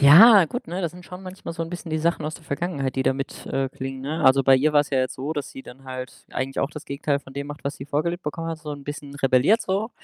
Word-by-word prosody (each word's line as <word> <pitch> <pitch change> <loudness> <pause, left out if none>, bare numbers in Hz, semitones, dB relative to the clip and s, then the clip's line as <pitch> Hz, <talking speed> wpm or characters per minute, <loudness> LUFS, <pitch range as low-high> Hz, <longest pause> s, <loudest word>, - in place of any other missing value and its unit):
Ja, 190 +8 +9
gut, 245 +9 -5
ne? 180 +3 -3
Das 170 - 0
sind 180 0 -12
schon 180 +1 -9
manchmal 185 -2 -7
so 165 - -3
'n 165 - -5
bisschen 175 -2 -6
die 155 - 0
Sachen 165 0 0
aus 155 - -4
der 170 - -11
Vergangenheit, 140 -3 -2
die 130 - +1
da - - +4
mit 135 +1 -6
äh, 135 0 -1
klingen, 135 0 -6
ne? 150 +4 -2
Also, 135 +1 +6
bei 135 0 +6
ihr 150 +4 +2
war's 145 -1 +3
ja 135 - +2
jetzt 130 - -1
so, 140 +4 -3
dass 145 -3 -4
sie 135 - -9
dann 135 +2 -13
halt 130 -1 -7
eigentlich 135 +1 -3
auch 140 - 0
das 150 -1 -9
Gegenteil 140 0 -1
von 135 - -14
dem 140 0 -4
macht, 145 - -8
was 140 +1 -2
sie 135 - -7
vorgelebt 170 +5 -1
bekommen 165 +2 -3
hat, 165 - -4
so 150 -2 -7
'n 145 -1 -8
bisschen 145 -1 -7
rebelliert, 135 - +4
so. 200 +5 -1
145 Hz, 295 wpm, -24 LUFS, 135-170 Hz, -, Ja